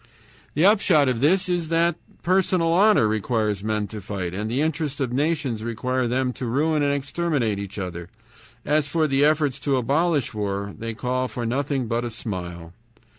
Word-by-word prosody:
The 155 +5 +3
upshot 190 -8 +5
of 125 -3 -1
this 180 +7 +3
is 175 -3 -1
that 165 0 +2 0.3
personal 185 -2 +2
honor 195 - +5
requires 105 -1 -1
men 105 -1 -1
to 105 0 -7
fight, 95 -3 -4
and 105 +3 -3
the 125 +4 -1
interests 155 -2 -1
of 130 -3 -1
nations 140 -5 -1
require 125 +2 -1
them 125 +1 0
to 125 - -5
ruin 150 +5 +1
and 145 0 +2
exterminate 140 -6 -1
each 100 0 -7
other. 85 -2 -5 0.6
As 150 0 +2
for 160 +2 +1
the 140 -1 +2
efforts 150 -3 +2
to 140 -1 +1
abolish 145 +2 +1
war, 100 -1 -3
they 115 0 -5
call 130 +2 -1
for 120 -1 -5
nothing 135 +2 -1
but 115 +1 -1
a 120 - -3
smile. 90 -7 -6
130 Hz, 175 wpm, -24 LUFS, 110-155 Hz, 0.6 s, upshot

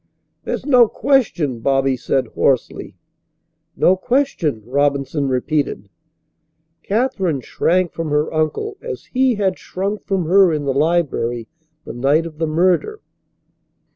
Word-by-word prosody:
"There's - - -3
no 250 -5 +6
question," 195 - 0
Bobby 135 +2 +1
said 130 +1 -1
hoarsely. - - -1 0.8
"No 185 - +4
question," 190 - -1
Robinson 140 +2 0
repeated. 130 -4 -1 0.9
Katherine 195 - -1
shrank 180 +7 0
from 165 -2 -4
her 150 +2 0
uncle 160 - -2
as 485 - -7
he 260 -1 +2
had 195 -3 -1
shrunk 200 +3 -4
from 190 -4 0
her 185 +1 +5
in 150 -2 -2
the 135 - 0
library 140 -7 0 0.4
the - - -7
night 140 +6 +1
of 160 -2 -9
the 160 - 0
murder. 180 - +1
160 Hz, 125 wpm, -19 LUFS, 140-200 Hz, 0.9 s, no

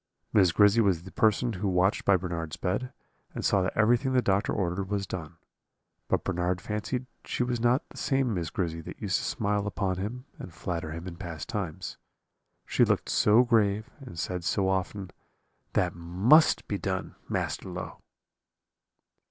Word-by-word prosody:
"Miss 95 -4 +5
Grizzy 105 +5 +5
was 95 -6 +2
the 95 - -10
person 110 +2 +2
who 100 +1 -2
watched 95 +1 +2
by 100 -1 +5
Bernard's 85 -3 -4
bed, 105 +8 -2 0.4
and - - -3
saw 95 - +3
that 90 - -2
everything 120 +4 +3
the 125 - +4
doctor 100 +1 +1
ordered 95 0 -1
was 100 -1 -1
done; 80 -3 -6 0.7
but - - +1
Bernard 90 0 0
fancied 105 +6 -3 0.2
she - - -1
was 120 -1 -1
not 120 +3 +2
the - - -15
same 135 -4 +1
Miss 85 -4 -2
Grizzy 80 -2 -2
that - - -9
used 100 -3 0
to - - -5
smile 105 -1 -1
upon 95 -3 -1
him 120 +7 -4
and 90 - -8
flatter 85 -1 -4
him 85 +3 -6
in 85 -2 -7
past 85 -5 -6
times, 90 -7 -4 0.7
she - - +3
looked - - +1
so 110 +4 +5
grave, 110 -3 +2
and 130 - -10
said 90 +1 -3
so 95 +1 +1
often, 95 0 -2 0.6
'That 90 -1 +1
must 95 - +4
be 100 - -2
done, 95 +1 -3 0.2
Master - - -2
Low.' - - -6
100 Hz, 170 wpm, -28 LUFS, 90-110 Hz, 0.7 s, Miss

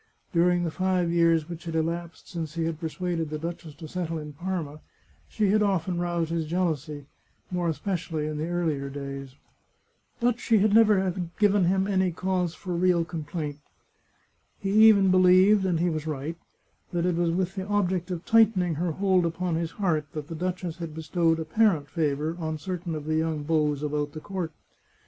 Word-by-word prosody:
During 175 +1 +3
the 165 - -1
five 185 -1 0
years 165 -2 +3
which 170 -1 -8
had 165 -1 -4
elapsed 165 +1 -3
since 165 -3 -5
he 165 -1 -1
had 165 -1 -3
persuaded 165 -1 -3
the 155 - -3
duchess 165 -1 -6
to 160 - -9
settle 165 0 -3
in 150 -1 -7
Parma, 165 -2 -4 0.5
she 210 -3 +1
had 215 +1 +3
often 185 -3 0
roused 170 -2 -1
his 165 -2 -1
jealousy, 155 -4 -2 0.5
more 175 -2 0
especially 165 -2 -2
in 155 0 -3
the 155 - -2
earlier 160 -6 -1
days. 140 -1 -7 0.8
But 240 -1 +1
she 230 -2 +3
had 205 +1 +3
never 210 -4 +5 0.3
given 205 -3 +4
him 190 +2 +2
any 190 -2 +1
cause 180 0 -1
for 180 -2 -5
real 175 -1 +2
complaint. 155 -3 -5 1.0
He 195 - -3 0.2
even 200 -3 +6
believed, 185 +2 +5
and 170 -3 +1
he 175 +1 +1
was 155 0 -4
right, 155 +3 -4 0.5
that 175 -1 0
it 180 -1 +1
was 170 0 +1
with 180 +2 -1
the 190 -1 -5
object 190 -3 0
of 175 -2 -4
tightening 210 -6 +4
her 165 +2 -1
hold 190 0 +2
upon 170 +1 -1
his 165 0 -1
heart 165 -5 -1
that 150 0 -6
the - - -5
duchess 180 0 -3
had 165 -3 -6
bestowed 165 0 +1
apparent 160 -2 +2
favour 155 0 -1
on 160 -1 -3
certain 175 0 -4
of 150 -1 -6
the 155 0 0
young 160 -2 -1
beaux 150 -1 +1
about 145 0 -2
the 155 - -6
court. 185 -2 -4
170 Hz, 180 wpm, -26 LUFS, 155-185 Hz, 1.0 s, even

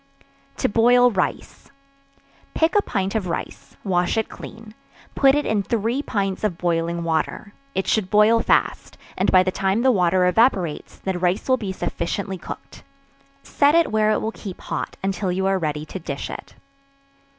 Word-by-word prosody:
To - - +1
Boil 245 +3 +4
Rice. 190 -4 -3 0.9
Pick 325 +4 +2
a 415 - +5
pint 195 - -2
of 215 -5 -1
rice, 170 - -6
wash 180 0 0
it 220 - 0
clean 220 -1 -11 0.4
put 270 0 +4
it 295 - 0
in 215 -2 +1
three 230 +5 -1
pints 195 -8 -2
of 195 -6 -1
boiling 170 -1 -1
water: 165 +5 -2 0.2
it 190 - 0
should 210 -4 0
boil 210 +2 +5
fast, - - 0 0.2
and - - +1
by 185 0 +6
the 185 - -1
time 195 +5 0
the 260 - +5
water 180 -3 +2
evaporates, 180 - +1
the 190 -2 -3
rice 180 +2 0
will 260 -1 +3
be 205 -5 -4
sufficiently 185 +1 -3
cooked; - - -9 0.6
set 290 +2 +2
it 335 -6 +3
where 215 0 +2
it 215 - +1
will 220 - -2
keep 195 -5 -9
hot, - - -5
until 195 -1 -1
you 190 +1 -1
are 195 0 +1
ready 150 -2 -3
to 190 - -7
dish 140 -4 -5
it. - - -9
195 Hz, 175 wpm, -22 LUFS, 180-225 Hz, 0.9 s, by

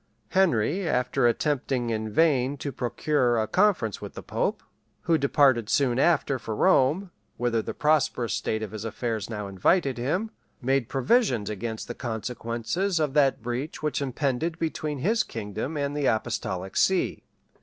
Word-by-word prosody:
Henry, 175 - +2
after 125 -1 +2
attempting 130 -2 0
in 110 -1 -2
vain 140 +1 +2
to 140 +1 -4
procure 120 0 0
a 110 - +1
conference 180 - +1
with - - -8
the - - -7
pope, - - -2 0.4
who 170 - +2
departed 135 -6 +3
soon 130 -3 +2
after 140 -4 +2
for 110 -1 -5
Rome, 155 - +3 0.3
whither 120 -2 +1
the - - -6
prosperous 150 -6 +1
state 110 0 -1
of 105 - -5
his 110 -1 -6
affairs 115 -1 -3
now 105 -3 -4
invited 125 - +1
him, 180 - -1 0.3
made 135 -1 0
provisions 135 - +2
against 110 +1 -5
the 120 - -4
consequences 120 - -2
of 150 -3 0
that 140 -6 +3
breach 125 +6 -4
which 150 -1 -1
impended 140 +4 -1
between 155 -3 -2
his 215 - +2
kingdom 115 +7 -4
and 140 0 -2
the 145 -2 +1
apostolic 105 -4 -2
see. 190 -1 +2
130 Hz, 155 wpm, -26 LUFS, 115-150 Hz, 0.4 s, departed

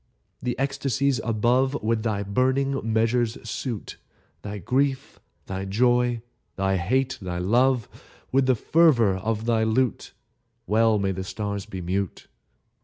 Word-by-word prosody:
The 125 -1 -2
ecstasies 135 -2 0
above 125 +5 +1
With 110 0 +1
thy 105 -3 -1
burning 130 +3 0
measures 115 +1 +1
suit: 115 -1 -5 0.4
Thy 105 0 -6
grief, 130 +7 -1 0.3
thy 95 0 -4
joy, 120 +3 +2 0.3
thy 95 0 +1
hate, 130 +8 0
thy 90 -2 -4
love, 120 +6 +2 0.4
With 135 0 +3
the 130 - +4
fervor 120 - +3
of 110 +3 -2
thy 115 -2 +2
lute: 120 +3 0 0.5
Well 110 +2 +3
may 100 -1 0
the 95 0 -4
stars 100 0 -4
be 95 -3 -6
mute! 95 +2 -3
115 Hz, 130 wpm, -25 LUFS, 100-130 Hz, 0.5 s, the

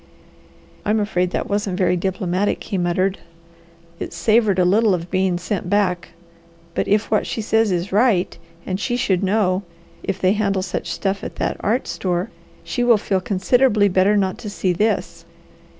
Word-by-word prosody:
"I'm 215 +1 +1
afraid 180 -4 0
that - - -3
wasn't 200 -2 -1
very 180 -2 +2
diplomatic," 185 +1 -1
he 205 - -4
muttered. 185 +2 0 0.8
"It - - -5
savoured 215 -3 +2
a 180 - +3
little 205 +2 +3
of 170 0 -7
being 185 -2 +1
sent 180 0 -3
back. 185 -3 +1 0.6
But - - -1
if 210 +2 +1
what 215 - +2
she - - -3
says 220 -1 +2
is 180 +1 -2
right, 205 -3 +2 0.3
and 185 0 -3
she 240 +3 -1
should 195 -8 +1
know 195 -1 +1 0.4
if 195 -1 -3
they 185 +1 +3
handle 200 -3 0
such 185 - -4
stuff 195 0 -2
at - - -6
that - - -2
art 230 +5 0
store, 180 +4 -2 0.3
she 245 - -2
will 240 -2 +5
feel 195 -2 -1
considerably 210 +3 +3
better 190 +3 +3
not 190 -2 0
to 210 - -6
see 190 -2 -1
this." 180 -4 -1
195 Hz, 170 wpm, -21 LUFS, 185-210 Hz, 0.8 s, will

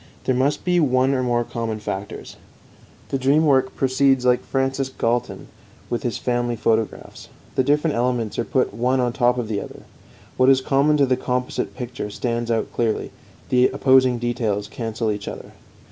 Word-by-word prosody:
There 130 - +1
must 135 +4 0
be 180 -1 +3
one 130 -3 +2
or 130 - 0
more 120 -1 +1
common 115 -2 -4
factors. 100 -1 -6 0.7
The 135 - -1
dream 140 +5 +3
work 130 -3 +2
proceeds 135 -1 +2
like 125 0 +3
Francis 135 0 -1
Galton 120 -2 -2 0.4
with 120 - -1
his 120 -4 -2
family 120 -1 -1
photographs. 110 -1 -2 0.2
The 130 - +2
different 150 +3 +1
elements 120 -2 -1
are - - +1
put 130 -1 0
one 125 +4 +1
on 120 -1 0
top 125 -1 +2
of 120 -3 -2
the 105 -2 -2
other; - - -10 0.5
what 130 +1 +5
is 135 -1 +6
common 140 +3 +2
to 140 - +4
the 130 -1 +1
composite 125 0 -2
picture 125 -4 -5
stands 120 +2 -3
out 115 -1 -1
clearly, 115 -2 -1 0.4
the 125 0 +4
opposing 130 -2 +3
details 115 -4 -2
cancel 115 0 -3
each 105 -1 -5
other. - - -7
125 Hz, 175 wpm, -22 LUFS, 115-135 Hz, 0.7 s, is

